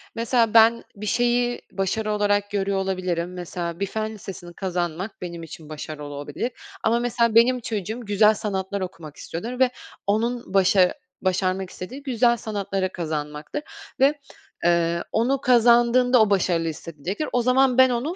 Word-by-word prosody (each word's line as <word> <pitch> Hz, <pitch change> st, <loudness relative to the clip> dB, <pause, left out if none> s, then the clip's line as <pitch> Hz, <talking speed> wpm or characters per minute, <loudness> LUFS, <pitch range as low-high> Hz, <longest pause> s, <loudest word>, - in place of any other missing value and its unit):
mesela 230 Hz, -1 st, +1 dB
ben 230 Hz, +1 st, +6 dB
bir 210 Hz, +1 st, -7 dB
şeyi 240 Hz, +2 st, +1 dB
başarı 210 Hz, +3 st, -1 dB
olarak 205 Hz, -1 st, +1 dB
görüyor 200 Hz, -1 st, 0 dB
olabilirim. 185 Hz, -2 st, -2 dB
Mesela 175 Hz, -1 st, -5 dB
bir 200 Hz, -, 0 dB
fen 220 Hz, +2 st, -3 dB
lisesini 185 Hz, -4 st, -9 dB
kazanmak 180 Hz, +1 st, -3 dB
benim 170 Hz, -2 st, -6 dB
için 155 Hz, -1 st, -10 dB
başarı 155 Hz, 0 st, -7 dB
olabilir 145 Hz, -, -4 dB, 0.3 s
ama 230 Hz, +2 st, +3 dB
mesela 235 Hz, -2 st, +1 dB
benim 250 Hz, +2 st, +5 dB
çocuğum 220 Hz, 0 st, -4 dB
güzel 210 Hz, +1 st, +4 dB
sanatlar 200 Hz, -2 st, -3 dB
okumak 165 Hz, -5 st, -7 dB
istiyordur 235 Hz, +9 st, -6 dB
ve 255 Hz, -1 st, +4 dB, 0.4 s
onun 230 Hz, +1 st, -1 dB
başa 190 Hz, -1 st, +4 dB, 0.3 s
başarmak 185 Hz, 0 st, 0 dB
istediği 255 Hz, +10 st, -8 dB
güzel 240 Hz, -3 st, +2 dB
sanatları 195 Hz, -3 st, -2 dB
kazanmaktır 155 Hz, -, -4 dB, 0.4 s
ve, 285 Hz, +2 st, +4 dB, 0.5 s
eee, 170 Hz, 0 st, +2 dB
onu 255 Hz, +4 st, +1 dB
kazandığında 240 Hz, 0 st, +5 dB
o 215 Hz, -, +4 dB
başarılı 175 Hz, -4 st, +1 dB
hissedecektir. 165 Hz, -, -5 dB
O 245 Hz, -, +3 dB
zaman 255 Hz, +1 st, +3 dB
ben 260 Hz, 0 st, +7 dB
onu 250 Hz, +8 st, -2 dB
205 Hz, 145 wpm, -24 LUFS, 180-235 Hz, 0.5 s, ben